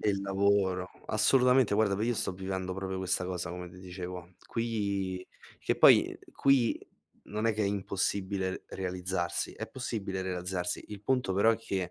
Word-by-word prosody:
E - - +1
il 100 -1 -1
lavoro, 95 -2 +2 0.2
assolutamente. 125 +1 +4
Guarda, 105 -2 +3
v 100 - -2
io 120 - +1
sto 95 - 0
vivendo 95 0 -4
proprio 95 0 -3
questa 95 0 +1
cosa 90 -2 -3
come 90 0 -6
ti 90 +1 -14
dicevo. 90 -1 -7
Qui 100 -5 -2 0.3
che - - 0
poi - - +6 0.2
qui 135 -4 +3 0.5
non 105 +2 -2
è 115 - +3
che 110 - 0
è - - +2
impossibile 95 -1 -1
realizzarsi, 90 -1 -2
è - - -6
possibile 105 -7 -3
realizzarsi. 90 -1 -2
Il 105 -1 -8
punto 125 -3 +1
però 105 +4 +5
è - - -1
che 95 -5 -3
95 Hz, 165 wpm, -30 LUFS, 90-105 Hz, 0.5 s, poi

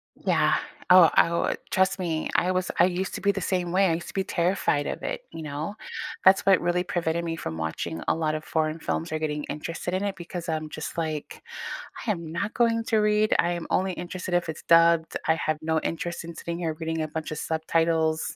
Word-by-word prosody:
Yeah, - - +2 0.3
oh, 180 -2 +9
I - - +6
oh, 170 - 0
trust 190 +1 +2
me, 165 -4 -2
I 180 - +3
was 185 0 0
I - - +8
used 185 +1 -2
to - - -5
be 200 +1 +3
the 200 - -3
same 180 -1 -1
way, 190 +1 +4
I 165 - +2
used 170 +1 -4
to - - -9
be 195 - 0
terrified 170 -4 +1
of - - -4
it, - - -4
you 165 - -5
know? 145 0 -4 0.6
That’s 190 +1 +6
what 195 -2 +6
really 175 0 +2
prevented 170 -1 0
me 165 - -2
from 80 - -5
watching 80 +1 -4
a - - +4
lot 155 0 +1
of 155 - -9
foreign 155 0 +1
films 165 - -1
or 155 - -1
getting 150 -1 -2
interested 165 +3 -4
in 190 - -3
it 195 - -6
because 170 0 -6
I’m 155 0 -2
just 155 - -5
like, 155 -2 -4 0.7
"I 225 - +2
am 170 - -6 0.2
not 205 +4 -2
going 230 -1 +3
to 220 - +3
read, 210 0 +3 0.2
I - - 0
am 165 - -8
only 190 0 -1
interested 180 0 -5
if 175 -2 +1
it’s 155 - -11
dubbed, 165 -1 +4
I 160 - +4
have 155 -1 +1
no 160 - +3
interest 170 +1 -5
in 170 0 -8
sitting 170 0 -4
here 165 -2 -1
reading 160 0 -2
a 155 - -1
bunch 160 -1 -3
of 155 - -4
subtitles," 160 0 +1
170 Hz, 230 wpm, -26 LUFS, 160-185 Hz, 0.7 s, oh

